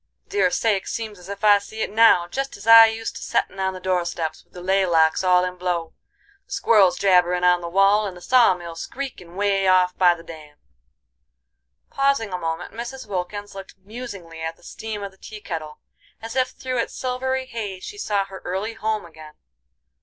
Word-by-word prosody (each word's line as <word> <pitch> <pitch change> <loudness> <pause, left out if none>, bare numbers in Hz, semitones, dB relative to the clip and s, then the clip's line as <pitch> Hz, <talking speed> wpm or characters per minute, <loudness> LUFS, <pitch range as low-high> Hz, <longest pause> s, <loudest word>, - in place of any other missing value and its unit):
Dear 405 -9 +2
sakes, 225 -7 0
seems 215 -4 -5
as 180 +2 -13
ef 200 +1 -7
I 205 -1 +6
see 220 +2 -6
it - - -4
now, 215 -5 +5
jest 270 +8 -4
as 200 - -12
I 225 0 +10
used 225 0 -4
to - - -9
settin' 195 - -1
on 190 0 -1
the - - -7
doorsteps 175 -3 -2
with - - -40
the 180 - -10
lay 190 +1 +2
locks 165 -1 +3
all 180 0 +4
in 180 0 -5
blow, 175 -2 -2 0.5
the - - -23
squirrels 200 -5 +4
jabberin' 180 -2 +3
on 180 0 +4
the 170 - -5
wall, 195 +3 +3
and 185 -2 -8
the - - -13
saw 240 -3 +4
mill 170 -2 -8
screekin' 180 -5 -7
way 195 -1 +1
off 185 -1 +4
by 175 -2 +4
the 165 - -13
dam." 155 -3 -12 1.3
Pausing 275 -7 +1
a 180 - -2
moment, 165 +2 -4
Mrs. 240 +4 -7
Wilkins 205 +1 -5
looked 195 -1 -10
musingly 195 -6 -9
at 160 0 -4
the - - -25
steam 215 -2 -6
of 200 - -6
the 190 - -25
tea 215 - -10
kettle, 160 -6 -6 0.4
as 225 +2 -8
if 255 -1 +2
through 255 -1 -4
its 230 - -3
silvery 260 +1 -2
haze 210 -7 -6
she 415 - -8
saw 205 - 0
her 195 -1 -11
early 195 +5 -3
home 220 -2 -2
again. 155 -2 -14
195 Hz, 200 wpm, -22 LUFS, 180-225 Hz, 1.3 s, I